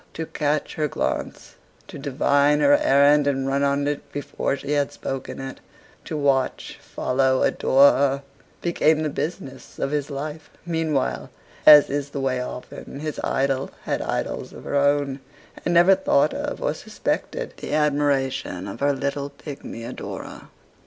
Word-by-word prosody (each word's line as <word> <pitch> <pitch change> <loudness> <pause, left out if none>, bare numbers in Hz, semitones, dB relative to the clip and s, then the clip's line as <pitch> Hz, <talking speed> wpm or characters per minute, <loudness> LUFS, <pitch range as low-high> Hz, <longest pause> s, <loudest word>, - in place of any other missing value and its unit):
To 160 - -3
catch 150 -1 -1
her 155 -1 0
glance, - - -3 0.3
to - - -9
divine 145 +1 +2
her 145 0 +6
errand 145 +1 +4
and 135 -1 0
run 135 +1 +1
on 140 0 +1
it 145 0 -4
before 140 -1 -2
she 140 - -6
had 145 -1 +1
spoken 135 0 -5
it; 135 0 -7 0.5
to 155 - -4
watch, 140 -2 0
follow, 130 0 +1
adore 140 +2 +5
her; 140 0 +1 0.4
became 160 -2 +2
the 155 - 0
business 150 -5 -6
of 135 - -2
his 145 -1 -1
life. 150 +2 -6 0.2
Meanwhile, 160 -5 -1 0.4
as 150 -2 +9
is 145 0 -2
the 140 - -5
way 130 -2 0
often, 125 +2 -8
his 155 -1 -4
idol 135 0 0
had - - -2
idols - - -3
of - - -11
her - - -5
own, 140 -1 +2 0.4
and - - 0
never 175 +3 +7
thought 190 -7 +2
of - - -4
or - - +1
suspected - - -3
the - - -3
admiration 140 -9 0
of 100 - -7
her 145 0 +2
little 140 +1 -3
pigmy 140 -4 -9
adorer. 120 +2 -7
140 Hz, 155 wpm, -23 LUFS, 135-150 Hz, 0.5 s, as